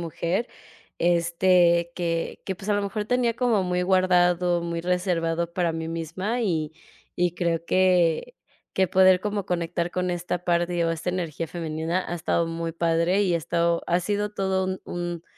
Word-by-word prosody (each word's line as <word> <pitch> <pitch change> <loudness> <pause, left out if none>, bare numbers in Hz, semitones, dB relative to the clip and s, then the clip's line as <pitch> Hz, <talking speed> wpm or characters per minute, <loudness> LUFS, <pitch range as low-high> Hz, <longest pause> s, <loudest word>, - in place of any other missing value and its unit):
mujer, 170 +6 -2 0.5
este, 170 0 +3
que 165 -2 -2
que 190 - -3
pues 195 +3 -10
a 205 - +3
lo 205 - 0
mejor 210 +1 -3
tenía 240 0 +1
como 235 -6 +1
muy 180 0 0
guardado, 180 -1 +3
muy 170 0 -3
reservado 170 -2 -1
para 170 -2 0
mí 160 0 -4
misma, 170 +8 -3
y 160 -8 -1 0.4
y 175 -1 +1
creo 170 -1 -1
que 185 - +2 0.4
que 190 -1 +3
poder 185 0 +5
como 205 -1 -2
conectar 170 0 -2
con 180 0 -2
esta 175 0 -3
parte 175 0 +1
o 165 - +1
esta 165 +2 -4
energía 165 -3 -3
femenina 165 +2 -2
ha - - -2
estado 170 0 0
muy 165 0 -3
padre 170 +4 +1
y 180 -3 +1
ha - - +3
estado, 170 +1 0
ha 175 - +3
sido 205 +3 -1
todo 190 -2 -1
un 185 0 -3
un, 175 -1 -5
175 Hz, 170 wpm, -25 LUFS, 170-185 Hz, 0.5 s, poder